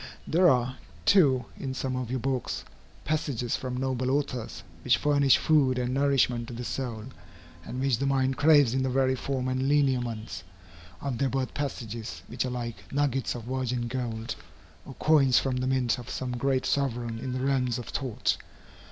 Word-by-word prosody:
There 180 Hz, +2 st, +5 dB
are, 125 Hz, 0 st, +1 dB, 0.3 s
too, 140 Hz, -10 st, +5 dB
in 130 Hz, -1 st, -4 dB
some 130 Hz, 0 st, -2 dB
of 125 Hz, -2 st, -3 dB
your 130 Hz, +1 st, -1 dB
books, 130 Hz, +1 st, -2 dB, 0.4 s
passages 140 Hz, -6 st, -1 dB
from 125 Hz, -1 st, -4 dB
noble 130 Hz, -1 st, -1 dB
authors, 135 Hz, -4 st, -2 dB, 0.2 s
which -, -, +4 dB
furnish 140 Hz, -2 st, +4 dB
food 140 Hz, -5 st, +3 dB
and 125 Hz, 0 st, -1 dB
nourishment 135 Hz, -4 st, +2 dB
to 120 Hz, -, -7 dB
the 120 Hz, -, -5 dB
soul, 120 Hz, -3 st, -4 dB, 0.6 s
and 125 Hz, +10 st, -6 dB
which 130 Hz, -3 st, +1 dB
the 140 Hz, -, 0 dB
mind 135 Hz, -1 st, +2 dB
craves 145 Hz, -5 st, +5 dB
in 130 Hz, -, +1 dB
the 130 Hz, -, 0 dB
very 130 Hz, 0 st, +2 dB
form 130 Hz, 0 st, -2 dB
and 130 Hz, +1 st, 0 dB
lineaments 120 Hz, -, 0 dB, 0.6 s
of 130 Hz, -4 st, -3 dB
their 135 Hz, -, +2 dB
birth 130 Hz, 0 st, -2 dB
passages 115 Hz, -5 st, -5 dB
which 125 Hz, -, -3 dB
are -, -, -2 dB
like 120 Hz, -2 st, -6 dB
nuggets 135 Hz, -3 st, 0 dB
of 120 Hz, -, -6 dB
virgin 125 Hz, -1 st, -2 dB
gold, 115 Hz, -2 st, -3 dB, 0.5 s
or 135 Hz, -, -9 dB
coins 140 Hz, -5 st, +4 dB
from 130 Hz, -2 st, +1 dB
the 125 Hz, 0 st, -1 dB
mint 130 Hz, -2 st, +1 dB
of 120 Hz, -, -9 dB
some 130 Hz, -1 st, -3 dB
great 130 Hz, +2 st, 0 dB
sovereign 120 Hz, -4 st, -1 dB
in 130 Hz, -, -4 dB
the 130 Hz, -, -2 dB
realms 130 Hz, -2 st, +1 dB
of 120 Hz, -, -6 dB
thought. 130 Hz, -5 st, -1 dB
130 Hz, 180 wpm, -28 LUFS, 120-135 Hz, 0.6 s, There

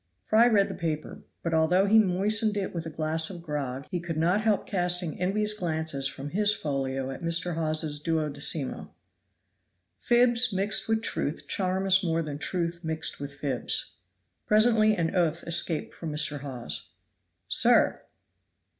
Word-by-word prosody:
Fry 225 Hz, +2 st, +5 dB
read 205 Hz, -4 st, +3 dB
the -, -, -6 dB
paper; 155 Hz, -2 st, -4 dB, 0.2 s
but 170 Hz, -, -2 dB
although 170 Hz, +4 st, +3 dB
he 220 Hz, +2 st, +5 dB
moistened 210 Hz, +2 st, +2 dB
it 195 Hz, -, -3 dB
with 165 Hz, -2 st, -5 dB
a -, -, -4 dB
glass 160 Hz, +1 st, -1 dB
of 175 Hz, -3 st, -9 dB
grog, 140 Hz, -4 st, -4 dB
he 180 Hz, -, -1 dB
could 170 Hz, -2 st, -5 dB
not 175 Hz, +6 st, +2 dB
help 215 Hz, -2 st, +1 dB
casting 175 Hz, -3 st, -1 dB
envious 210 Hz, +3 st, +1 dB
glances 160 Hz, -7 st, -2 dB
from 135 Hz, +1 st, -7 dB
his 210 Hz, +2 st, +3 dB
folio 135 Hz, -6 st, -3 dB
at -, -, -8 dB
Mr. 170 Hz, +1 st, +1 dB
Hawes's 155 Hz, -2 st, -2 dB
duodecimo. 150 Hz, -2 st, -2 dB, 1.1 s
Fibs 240 Hz, 0 st, +3 dB
mixed 205 Hz, +4 st, +1 dB
with 225 Hz, 0 st, +1 dB
truth 150 Hz, -8 st, -2 dB
charm 190 Hz, 0 st, -1 dB
us 190 Hz, 0 st, +4 dB
more 165 Hz, -1 st, 0 dB
than 145 Hz, -2 st, -6 dB
truth 170 Hz, +1 st, -2 dB
mixed 160 Hz, 0 st, -3 dB
with 140 Hz, 0 st, -7 dB
fibs. 135 Hz, -3 st, -2 dB, 0.5 s
Presently 215 Hz, 0 st, +4 dB
an 170 Hz, +1 st, -2 dB
oath 170 Hz, -2 st, +1 dB
escaped 170 Hz, -1 st, +1 dB
from 165 Hz, -2 st, -6 dB
Mr. 150 Hz, -1 st, +1 dB
Hawes. 130 Hz, -4 st, -6 dB, 0.5 s
"Sir!" -, -, +3 dB
170 Hz, 155 wpm, -27 LUFS, 155-200 Hz, 1.1 s, Fry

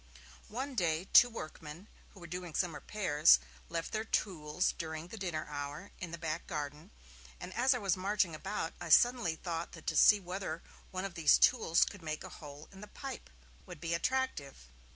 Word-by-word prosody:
One 265 Hz, +6 st, -4 dB
day, 170 Hz, -4 st, 0 dB
two 245 Hz, -, +9 dB
workmen, 160 Hz, -3 st, -8 dB, 0.3 s
who -, -, -13 dB
were 175 Hz, -, -10 dB
doing 175 Hz, -1 st, -6 dB
some 175 Hz, -3 st, 0 dB
repairs, 155 Hz, -1 st, +4 dB, 0.3 s
left 165 Hz, 0 st, -3 dB
their 215 Hz, 0 st, -1 dB
tools 180 Hz, -6 st, -1 dB
during 160 Hz, +1 st, -5 dB
the 225 Hz, -, -7 dB
dinner 175 Hz, -5 st, -3 dB
hour 145 Hz, +5 st, -6 dB
in 175 Hz, -, -5 dB
the 170 Hz, -, -6 dB
back 165 Hz, -1 st, -4 dB
garden, 150 Hz, -1 st, -5 dB, 0.5 s
and 185 Hz, -, -7 dB
as 255 Hz, +2 st, +3 dB
I -, -, 0 dB
was 195 Hz, -6 st, +1 dB
marching 190 Hz, -2 st, 0 dB
about 160 Hz, +1 st, -4 dB
I -, -, -5 dB
suddenly 240 Hz, -1 st, +5 dB
thought 165 Hz, 0 st, -4 dB
that 165 Hz, -, -11 dB
to 160 Hz, -, -1 dB
see 205 Hz, +6 st, +7 dB
whether 180 Hz, -3 st, -5 dB, 0.3 s
one 185 Hz, +1 st, -4 dB
of 195 Hz, -, -5 dB
these 160 Hz, -3 st, +5 dB
tools 220 Hz, -9 st, +4 dB
could 205 Hz, -, -9 dB
make 155 Hz, -1 st, -4 dB
a -, -, -8 dB
hole 145 Hz, 0 st, -11 dB
in 195 Hz, 0 st, -13 dB
the 210 Hz, -, -9 dB
pipe 265 Hz, +4 st, -8 dB, 0.4 s
would 175 Hz, -, -9 dB
be 165 Hz, +1 st, -2 dB
attractive. 170 Hz, -, -2 dB
170 Hz, 190 wpm, -33 LUFS, 155-200 Hz, 0.5 s, two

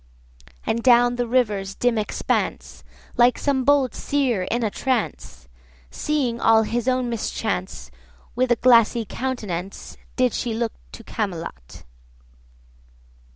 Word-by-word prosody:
And 230 Hz, -, -1 dB
down 245 Hz, 0 st, +5 dB
the 245 Hz, -1 st, -1 dB
river's 210 Hz, -6 st, 0 dB
dim 245 Hz, -2 st, +1 dB
expanse— 210 Hz, -, -2 dB, 0.3 s
Like 240 Hz, 0 st, +4 dB
some 275 Hz, -2 st, 0 dB
bold 280 Hz, -2 st, +3 dB
seer 250 Hz, -10 st, -1 dB
in 240 Hz, +1 st, -1 dB
a 215 Hz, -, 0 dB
trance, 230 Hz, -, -3 dB, 0.4 s
Seeing 255 Hz, -, -1 dB
all 220 Hz, 0 st, +5 dB
his 235 Hz, +2 st, -2 dB
own 255 Hz, -1 st, +1 dB
mischance— 220 Hz, -4 st, -3 dB, 0.4 s
With 255 Hz, 0 st, 0 dB
a -, -, +6 dB
glassy 235 Hz, -1 st, +4 dB
countenance 205 Hz, -8 st, -5 dB
130 -, -, -29 dB
Did 255 Hz, -2 st, +2 dB
she 240 Hz, -2 st, -2 dB
look 230 Hz, -1 st, -2 dB, 0.2 s
to 230 Hz, -, -10 dB
Camelot. 165 Hz, -, -6 dB
235 Hz, 125 wpm, -23 LUFS, 215-255 Hz, 0.4 s, a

